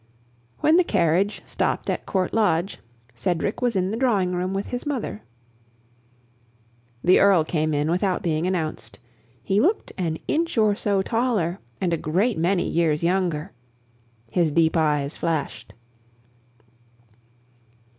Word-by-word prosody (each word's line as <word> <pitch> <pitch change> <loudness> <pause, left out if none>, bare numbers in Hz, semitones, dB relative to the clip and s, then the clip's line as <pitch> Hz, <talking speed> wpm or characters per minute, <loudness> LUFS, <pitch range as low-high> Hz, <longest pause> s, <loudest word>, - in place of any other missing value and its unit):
When 315 +2 +5
the 365 - +5
carriage 180 - +1
stopped - - -2
at - - -3
Court 185 -2 -1
Lodge, 195 -4 +1 0.3
Cedric 175 - -2
was 245 -3 +1
in 185 0 0
the 220 - -2
drawing 210 -8 +1
room 180 +1 -2
with 195 +1 -2
his 245 0 -5
mother. 265 - -4 1.8
The 180 - +5
Earl 195 -5 +5
came 155 -1 -1
in 150 +2 0
without 185 +1 0
being 160 0 0
announced. 155 -11 -3 0.5
He 195 +7 +2
looked 405 +7 0
an 165 -3 -1
inch 330 -4 -1
or 215 -2 +4
so 200 -1 0
taller, 220 -7 0 0.2
and 175 -3 0
a - - +1
great 185 +7 0
many 175 +2 +1
years 160 -2 +1
younger. 175 -4 0 0.8
His 170 -3 +2
deep 160 +2 +2
eyes 150 -2 +1
flashed. 155 -9 -3
180 Hz, 135 wpm, -23 LUFS, 160-205 Hz, 1.8 s, When